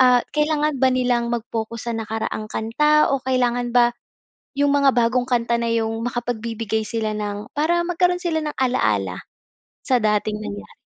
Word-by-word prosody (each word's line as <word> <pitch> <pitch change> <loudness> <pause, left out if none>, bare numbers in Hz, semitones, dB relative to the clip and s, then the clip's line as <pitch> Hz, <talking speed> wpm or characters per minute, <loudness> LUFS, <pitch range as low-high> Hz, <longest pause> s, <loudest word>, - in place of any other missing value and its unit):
Ah, 250 -1 +6
kailangan 300 -1 +1
ba 260 - +6
nilang 245 -2 +1
mag-focus 230 0 -4
sa - - -1
nakaraang 220 -1 -3
kanta? 300 +7 +2
O 265 - -9
kailangan 245 -2 +1
ba 240 -1 +5 0.7
yung 285 0 +3
mga 280 -1 +4
bagong 245 +1 +2
kanta 235 -1 +1
na 230 - 0
yung 225 0 -1
makapagbibigay 230 -2 -2
sila 220 -1 -2
ng 205 0 -4
para 345 +3 +2
magkaroon 360 0 +2
sila 325 -3 -1
ng 300 - -4
ala-ala 105 - 0 0.6
sa 255 -2 +3
dating 210 0 +1
nangyari. 100 - -8
240 Hz, 155 wpm, -22 LUFS, 220-265 Hz, 0.7 s, Ah